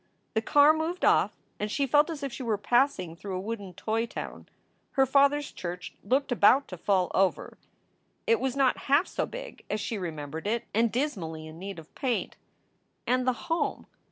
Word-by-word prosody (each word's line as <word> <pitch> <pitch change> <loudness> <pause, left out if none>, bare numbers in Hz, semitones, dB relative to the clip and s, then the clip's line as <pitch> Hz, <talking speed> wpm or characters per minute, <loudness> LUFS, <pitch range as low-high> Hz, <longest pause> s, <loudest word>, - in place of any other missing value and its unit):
The 220 - +1
car 290 +5 +6
moved 320 +3 -1
off - - +4 0.3
and 210 - -2
she 280 +5 +1
felt 295 +4 +4
as 310 -3 -5
if 275 -3 -3
she - - -6
were 225 -4 0
passing 225 - +1
through 190 +2 -5
a - - -3
wooden 200 -3 -5
toy 225 +4 -1
town. - - -7 0.4
Her 270 -1 +4
father 280 +2 +4
s 290 - -6
church 175 0 -6
looked 265 +6 +1
about 250 +4 +5
to 180 - -7
fall 185 -1 +1
over. 190 -1 0 0.7
It 460 -2 +3
was 265 -1 -1
not 270 -2 +3
half 285 +6 +5
so - - -2
big - - -8
as 210 - -1
she 210 +1 -3
remembered 160 -1 -5
it, 230 +2 0
and 225 +1 +3
dismally 185 - -2
in 155 +1 -10
need 195 0 -6
of 160 -1 -12
paint. 255 -4 -2 0.7
And 255 +1 +1
the 255 - +4
home! 330 +1 -1
235 Hz, 190 wpm, -28 LUFS, 190-280 Hz, 0.7 s, car